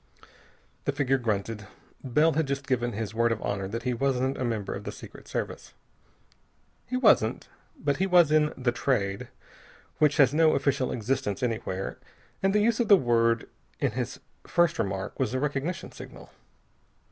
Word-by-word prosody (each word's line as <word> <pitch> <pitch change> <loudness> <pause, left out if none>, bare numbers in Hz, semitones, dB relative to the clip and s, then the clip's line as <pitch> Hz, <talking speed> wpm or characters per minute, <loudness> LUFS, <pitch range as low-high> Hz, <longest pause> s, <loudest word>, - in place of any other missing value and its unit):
The - - +1
figure 135 -2 +1
grunted. 105 -2 -2 0.4
Bell 150 +5 +3
had 160 -1 0
just 140 0 -3
given 120 -2 0
his 105 0 -4
word 115 +1 +2
of 115 - -1
honor 100 -1 -2
that 115 +4 -5
he 125 0 0
wasn't 130 +1 0
a - - -3
member 115 -5 -2
of - - -6
the - - -5
Secret - - -12
Service. - - -5 1.1
He 255 - -1
wasn't. 210 - +3 0.3
But 145 -1 0
he 190 - +1
was 175 -4 +5
in 155 -1 +4
the 130 -2 +1
Trade 100 -6 -1 0.7
which 150 -1 +3
has 140 -2 +5
no 160 0 +4
official 135 -2 0
existence 125 -1 -2
anywhere. 110 -5 -3 0.4
And 195 - +3
the 210 +1 +3
use 230 +1 +2
of 235 - +2
the 200 - +8
word 115 -4 +2 0.3
in - - +1
his - - -4 0.3
first 175 -2 +2
remark 95 -2 -3
was 115 - 0
a - - +1
recognition 150 +4 -2
signal. - - -12
130 Hz, 170 wpm, -27 LUFS, 115-150 Hz, 1.1 s, the